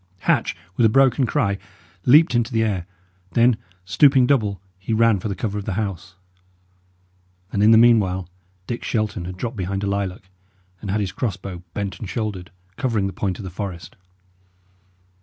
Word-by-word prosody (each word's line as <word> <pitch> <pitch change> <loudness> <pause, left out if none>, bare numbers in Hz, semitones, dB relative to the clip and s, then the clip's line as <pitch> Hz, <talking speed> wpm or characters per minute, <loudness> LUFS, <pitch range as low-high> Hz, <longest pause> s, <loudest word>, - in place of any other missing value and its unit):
Hatch, - - +1 0.2
with - - +3
a 110 - +6
broken 135 +1 +3
cry, 100 -10 0 0.5
leapt 150 +3 +6
into 120 +1 +1
the 115 -1 +2
air; 95 -5 -2 0.5
then, 120 0 +4 0.3
stooping 130 +7 +5
double, 110 -7 +1 0.2
he 95 +4 -3
ran 115 -2 +4
for 100 - -4
the 100 - -3
cover 105 +2 -3
of 100 - -7
the 105 - -2
house. 95 -4 -4 1.4
And 100 - +1
in 105 - +6
the 110 - +7
meanwhile 100 -6 +4 0.4
Dick 120 +3 -5
Shelton 110 -6 -2
had 90 +1 -7
dropped 115 +4 -4
behind 95 +1 -2
a - - -1
lilac, 95 -1 -3 0.5
and 100 - -6
had 105 +2 0
his 95 -2 -2
crossbow 95 -4 -4
bent 100 -3 -4
and 105 - -6
shouldered, 105 -6 -4 0.3
covering 115 -8 0
the 95 - -3
point 95 0 -2
of - - -8
the 95 - -6
forest. 95 -2 -6
105 Hz, 175 wpm, -22 LUFS, 95-115 Hz, 1.4 s, the